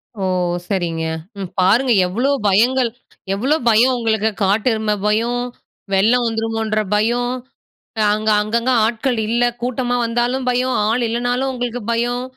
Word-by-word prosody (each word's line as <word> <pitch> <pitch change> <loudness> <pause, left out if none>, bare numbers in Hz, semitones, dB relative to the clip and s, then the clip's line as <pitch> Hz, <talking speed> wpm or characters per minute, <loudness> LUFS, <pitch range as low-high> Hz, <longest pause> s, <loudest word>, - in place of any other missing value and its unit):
ஓ! 200 - -5 0.4
சரிங்க. 170 -5 -2 0.3
ம், 190 -3 -5
பாருங்க 220 +8 +3 0.2
எவ்ளோ 240 +10 0 0.2
பயங்கள், 240 +5 +3 0.4
எவ்ளோ 255 +10 +1
பயம் 235 +4 +4
உங்களுக்கு! 220 -2 +1
காட்டெருமை 215 +2 +1
பயம், 230 +3 +1 0.5
வெள்ளம் 230 +6 +3
வந்துருமோன்ற 225 -1 -1 0.2
பயம், 240 +3 +1 0.7
அ - - 0
அங்க 215 +1 0
அங்கங்க 230 +4 0
ஆட்கள் 235 +2 -1
இல்ல 240 +2 +2 0.2
கூட்டமா 245 0 -1
வந்தாலும் 240 +3 -1
பயம். 250 +1 0
ஆளு 235 +3 +1
இல்லனாலும் 245 +3 -1
உங்களுக்கு 245 -1 -4
பயம். 240 +1 -1
230 Hz, 125 wpm, -19 LUFS, 215-245 Hz, 0.7 s, பயம்